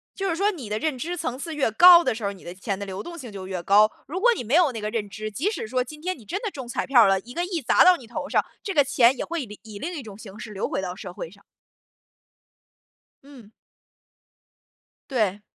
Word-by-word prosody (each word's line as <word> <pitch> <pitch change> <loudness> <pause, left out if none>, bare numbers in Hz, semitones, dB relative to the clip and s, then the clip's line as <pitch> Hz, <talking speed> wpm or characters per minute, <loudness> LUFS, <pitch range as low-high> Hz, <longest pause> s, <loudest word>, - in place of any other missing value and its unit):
就 390 - -2
是 335 - 0
说 400 +4 +2
你 295 - -8
的 210 - -1
认 300 +2 -2
知 340 +8 -4
层 260 -6 -4
次 320 +2 -5
越 275 -6 +1
高 345 +8 +9
的 - - +1
时 225 - -8
候 200 - 0
儿， - - -8
你 195 - -16
的 175 - -7
钱 195 +1 -4
的 200 - -5
流 190 0 -6
动 340 +8 -8
性 255 -8 -9
就 190 -2 -8
越 185 -2 -4
高。 210 +3 +5 0.2
如 345 +6 -4
果 485 +5 +5
你 - - -4
没 240 +6 0
有 340 -5 +5
那 225 - -5
个 210 - -2
认 215 -2 -3
知， 215 +1 -6
即 290 - -1
使 410 - -5
说 250 +2 0
今 300 +4 -12
天 370 +1 -3
你 225 - -16
真 390 - -4
的 440 - -3
中 265 -7 -8
彩 240 - -2
票 260 -3 +6
儿 - - +5
了， 195 0 +3
1 245 +5 -12
个 345 +4 -1
亿 355 -3 -3
砸 245 - +5
到 365 0 +8
你 255 - -13
头 235 - -5
上， - - +2 0.2
这 395 - -3
个 290 - +5
钱 255 -1 +4
也 - - -2
会 330 -4 -4
里 210 -2 -12
以 215 -2 -10
另 345 - -4
一 300 -6 -6
种 205 -3 -11
形 205 -2 -11
式 215 0 -8
流 200 -1 -3
回 - - -2
到 180 -1 -5
社 185 -2 -8
会 165 - -7
上。 200 +1 -19 1.8
嗯。 260 -7 -15 1.6
对。 210 -5 0
240 Hz, 285 characters per minute, -24 LUFS, 205-320 Hz, 1.8 s, 高